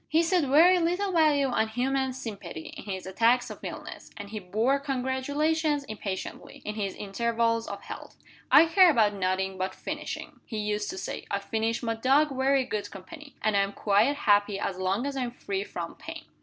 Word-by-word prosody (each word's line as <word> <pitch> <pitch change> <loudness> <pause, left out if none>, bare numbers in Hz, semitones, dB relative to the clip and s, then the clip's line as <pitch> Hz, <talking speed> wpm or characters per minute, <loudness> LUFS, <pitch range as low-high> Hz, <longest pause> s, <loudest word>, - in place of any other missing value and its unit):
He 320 +2 +3
set 345 -2 +2
very 335 +7 +6
little 355 +4 0
value 305 -5 +4
on 220 -3 +1
human 265 +3 0
sympathy, 200 -10 -7
in - - -9
his 190 -2 -5
attacks 230 +6 +2
of - - -9
illness; - - -8
and 205 -1 -8
he 215 - -4
bore 220 +9 +1
congratulations 285 +3 0
impatiently, 205 -6 -6
in 210 - -3
his 200 -3 -3
intervals 230 +2 0
of - - -7
health. - - -9 0.4
"I - - +9
care 360 +2 +6
about 220 -9 +3
nothing 190 0 -1
but 185 0 -2
fishing," - - -6
he 220 - -5
used 210 0 -1
to 370 - -5
say. - - -5
"I - - 0
find 225 +1 -2
my 230 -1 0
dog 270 +5 +2
very 265 0 +2
good 210 -4 -3
company. 285 - -11
And 215 -1 +2
I - - +4
am 195 0 -1
quite 215 +9 +2
happy 205 -5 +2
as 185 -1 -3
long 190 +6 0
as 280 -1 -3
I 265 - -1
am 245 -1 -2
free 195 -5 -3
from 170 -4 -6
pain." 325 +1 -9
235 Hz, 195 wpm, -28 LUFS, 205-285 Hz, 0.4 s, I